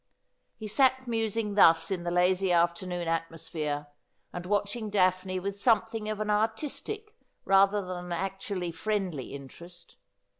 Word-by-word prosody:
He 215 - -6
sat 260 +3 +3
musing 225 -2 -1
thus 165 -4 +5
in 185 -2 -1
the 175 - -2
lazy 180 +2 +2
afternoon 175 0 +1
atmosphere, 160 -3 -3 0.5
and 175 0 -6
watching 205 +2 -1
Daphne 185 -1 +1
with 200 +2 -4
something 225 -2 +2
of 215 -1 -3
an 210 0 -1
artistic 280 - -2 0.3
rather 195 +1 +4
than 180 -1 -5
an 180 - -8
actually 190 0 -3
friendly 180 - -3
interest. 170 +6 -11
195 Hz, 135 wpm, -29 LUFS, 175-215 Hz, 0.5 s, thus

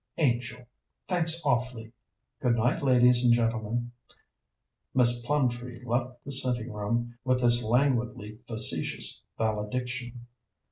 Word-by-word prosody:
"Angel, 120 -4 -1 0.4
thanks 165 -2 +2
awfully. 125 -4 -2 0.5
Good 125 -3 +1
night, 120 +2 0
ladies 125 -2 +4
and 120 - +4
gentlemen." 120 0 -2 1.0
Miss 120 -2 +3
Plumtree 125 -3 -2
left 120 +1 -3
the 140 - -6
sitting 125 -4 -2
room 120 +3 -3
with 130 -1 +1
this 120 0 +8
languidly 120 -3 -1
facetious 110 -2 0 0.2
valediction. 120 +3 -4
120 Hz, 105 wpm, -27 LUFS, 115-125 Hz, 1.0 s, this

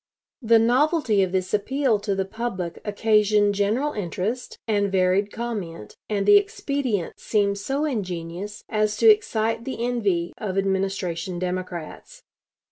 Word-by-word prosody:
The 230 -1 +5
novelty 250 - +3
of 190 -2 +1
this 185 -1 -2
appeal 240 +2 +1
to 200 -1 -2
the 195 0 -1
public 190 -5 -4
occasioned 210 -1 +3
general 220 +9 0
interest 210 +5 -3
and 205 -2 +1
varied 190 +2 +2
comment, 200 - -5
and 200 -2 0
the 410 - +8
expedient 280 - -2
seemed 200 -2 0
so 275 +8 -1
ingenious 190 - -4
as 215 -1 0
to 450 - +6
excite 225 - 0
the 240 -2 -3
envy 200 -9 0
of 195 -3 -3
Administration 190 -3 -1
Democrats. 180 - -5
205 Hz, 130 wpm, -24 LUFS, 190-235 Hz, -, the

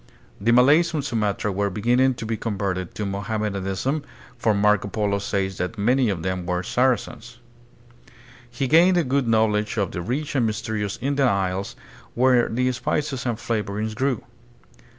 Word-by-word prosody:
The 115 +4 +2
Malays 150 +8 +5
on 145 - -1
Sumatra 105 -5 -1
were 100 +1 0
beginning 125 +6 +2
to 115 - -6
be 115 +1 -1
converted 95 -5 -3
to 105 - -3
Mohammedanism, 100 +5 -2 0.3
for 115 -3 +1
Marco 105 0 +2
Polo 100 -1 -1
says 95 -1 -2
that 90 +5 -3
many 125 +4 +2
of 90 -5 -3
them 95 -1 -3
were 90 0 -1
"Saracens." 120 0 -1 1.1
He 125 +3 -2
gamed 175 +6 +5
a 175 - +3
good 135 -1 0
knowledge 110 -1 +1
of 100 -4 0
the 90 - -4
rich 135 - -3
and 125 -5 +2
mysterious 110 -2 -3
Indian 140 -1 +2
Isles, 95 -1 -1 0.4
where 125 -1 +3
the 125 +2 +1
spices 130 +1 -2
and 120 -2 -1
flavorings 110 -1 -2
grew. 130 0 -1
110 Hz, 155 wpm, -23 LUFS, 100-125 Hz, 1.1 s, Malays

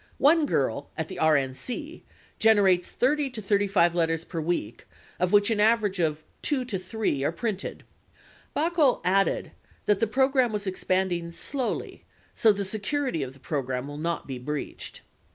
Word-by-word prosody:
One 305 +1 +4
girl 140 - -1
at 160 -1 -3
the 185 - -7
RNC 160 - 0 0.4
gener 205 -4 +5
ates 175 -1 -3
30 285 +2 +1
to 250 -3 -6
35 200 -4 +2
letters 165 -1 0
per 165 -3 -4
week, 155 -9 -3 0.3
of 180 0 +1
which 205 +2 +4
an 215 - 0
average 210 -3 +3
of 155 -2 0 0.2
two 270 -4 0
to 210 -7 -3
three 185 -7 -2
are 145 - +1
printed." 200 +3 -4 0.7
43 330 +1 +2
Baukol - - -19
added 195 +2 +1 0.3
the 210 +2 +2
program 260 +1 +2
was 210 -1 -3
expanding 185 -2 -1
"slowly, 260 +8 -3 0.3
so 220 - +5
the 200 -1 -2
security 215 - -1
of 130 -1 -4
the 135 - -18
program 130 -3 -3
will 145 +1 -7
not 170 +1 -2
be 130 -2 -6
breached." 150 +3 -6
190 Hz, 160 wpm, -26 LUFS, 160-230 Hz, 0.7 s, gener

